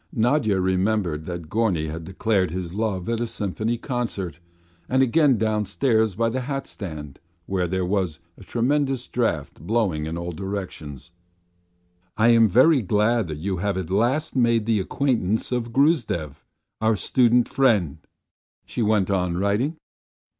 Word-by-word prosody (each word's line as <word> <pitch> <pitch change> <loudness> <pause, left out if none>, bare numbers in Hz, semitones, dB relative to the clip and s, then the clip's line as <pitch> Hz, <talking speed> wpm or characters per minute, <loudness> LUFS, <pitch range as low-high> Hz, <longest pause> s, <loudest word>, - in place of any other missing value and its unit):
Nadya 115 -4 +2
remembered 95 -4 0
that 85 -3 -5
Gorny 90 -5 0
had 80 +1 -6
declared 95 +1 0
his 90 0 -5
love 100 -4 -2
at 115 -1 -1
a 120 - -1
Symphony 110 +3 -2
concert, 115 - -4 0.5
and 130 +1 +3
again 135 0 +3
downstairs 110 0 +1
by 115 +2 +1
the 120 +3 -1
hatstand 100 - -6 0.3
where 90 -1 -1
there 95 +1 -1
was 90 -4 -1 0.2
a - - -14
tremendous 130 +4 0
draught 100 - -2
blowing 90 -5 0
in 80 +1 -4
all 85 +1 -4
directions. 85 -5 -6 1.1
"I 110 +2 +4
am 115 -1 +6
very 130 - +5
glad 105 +2 +1
that 75 -2 -5
you 95 +4 -2
have 100 +1 -1
at 95 -2 -4
last 125 +11 +1
made 115 -3 +2
the 110 -2 +2
acquaintance 110 0 0
of 120 -2 -2
Gruzdev, 120 - +1 0.4
our 110 0 +3
student 120 +3 +3
friend," 105 - +2 0.7
she - - -4
went 105 -3 +2
on 90 -3 0
writing. 105 - 0
105 Hz, 145 wpm, -23 LUFS, 90-120 Hz, 1.1 s, am